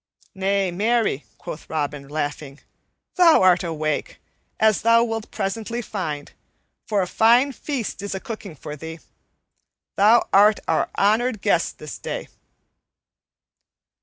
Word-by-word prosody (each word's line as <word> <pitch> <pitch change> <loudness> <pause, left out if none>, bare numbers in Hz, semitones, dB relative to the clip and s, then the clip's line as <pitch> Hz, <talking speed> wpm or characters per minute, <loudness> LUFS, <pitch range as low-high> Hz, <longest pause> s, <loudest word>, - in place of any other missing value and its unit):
"Nay, 195 -1 0
marry," 215 - 0
quoth 155 - -9
Robin, 145 -2 -3
laughing, 145 -1 -4 0.6
"thou 335 - +6
art 185 0 +5
awake, 155 -3 -3 0.4
as 220 -2 +3
thou 230 +1 +5
wilt 225 -2 -4
presently 220 +3 -3
find, 165 -10 -5 0.6
for 205 -3 +1
a - - -4
fine 235 +8 +4
feast 255 -5 -4
is 200 -1 -4
a - - -3
cooking 215 -7 -8
for 150 +1 -8
thee. 160 +2 -8 1.0
Thou 220 +4 +5
art 205 +2 +6
our - - +1
honored 220 +2 +1
guest 175 -5 +1
this 150 -2 -8
day." - - -5
200 Hz, 125 wpm, -22 LUFS, 160-225 Hz, 1.0 s, thou